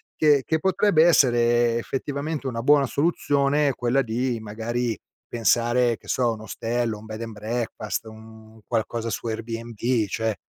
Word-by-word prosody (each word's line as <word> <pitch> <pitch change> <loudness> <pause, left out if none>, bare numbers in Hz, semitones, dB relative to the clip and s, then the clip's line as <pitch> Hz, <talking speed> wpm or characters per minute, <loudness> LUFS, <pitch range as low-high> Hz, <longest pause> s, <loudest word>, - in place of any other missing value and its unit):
che 150 -3 +4
che 160 -1 0
potrebbe 190 -3 +3
essere 120 -6 +4
effettivamente 140 +4 -3
una 115 -3 -3
buona 145 -1 +4
soluzione, 145 -1 +1
quella 125 +3 +1
di 120 +1 -2
magari 115 +2 -3 0.3
pensare, 120 +1 +2
che - - -20
so, 130 - 0
a - - +1
un 110 - -9
ostello, 115 +1 -2
un 110 - -13
bed 110 +1 -7
and 115 -1 -6
breakfast, 110 +1 -4
un 110 0 -14
qualcosa 115 0 -2
su 115 - -4
Airbnb, 115 0 -2
cioè 110 +1 -2
120 Hz, 150 wpm, -24 LUFS, 110-135 Hz, 0.3 s, che